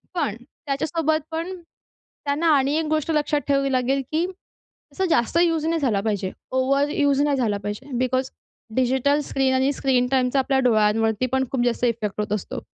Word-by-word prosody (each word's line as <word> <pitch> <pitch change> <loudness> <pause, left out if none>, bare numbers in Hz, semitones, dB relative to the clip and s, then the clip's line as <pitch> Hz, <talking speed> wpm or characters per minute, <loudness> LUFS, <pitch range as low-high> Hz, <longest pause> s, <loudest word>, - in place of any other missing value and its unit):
पण 285 - -1
त्याच्यासोबत 310 +2 -1
पण 335 +4 -3 0.7
त्यांना 290 +4 0
आणि 275 +1 +2
एक 320 - 0
गोष्ट 310 0 0
लक्षात 295 -1 +1
ठेवावी 275 -1 +1
लागेल 260 +2 +1
की 320 +2 +1 0.7
तसं 380 - -1
जास्त 240 +6 +2
यूज 325 -2 +1
नाही 330 0 0
झाला 230 -8 +1
पाहिजे. 200 -3 -2 0.2
ओव्हर 275 +2 +2
यूज 285 -2 +2
नाही 290 -1 +2
झाला 220 -6 0
पाहिजे. 210 +7 -6
बिकॉज 255 +1 0 0.4
डिजिटल 265 +3 +2
स्क्रीन 265 -1 +1
आणि 265 +2 +2
स्क्रीन 260 -3 +1
टाईमचा 260 0 +2
आपल्या 265 0 +1
डोळ्यांवरती 220 +2 +2
पण 265 0 +2
खूप 245 -2 +1
जास्त 240 +1 0
इफेक्ट 215 -3 -1
होत 210 - -3
असतो. 205 - -5
270 Hz, 170 wpm, -23 LUFS, 240-290 Hz, 0.7 s, आणि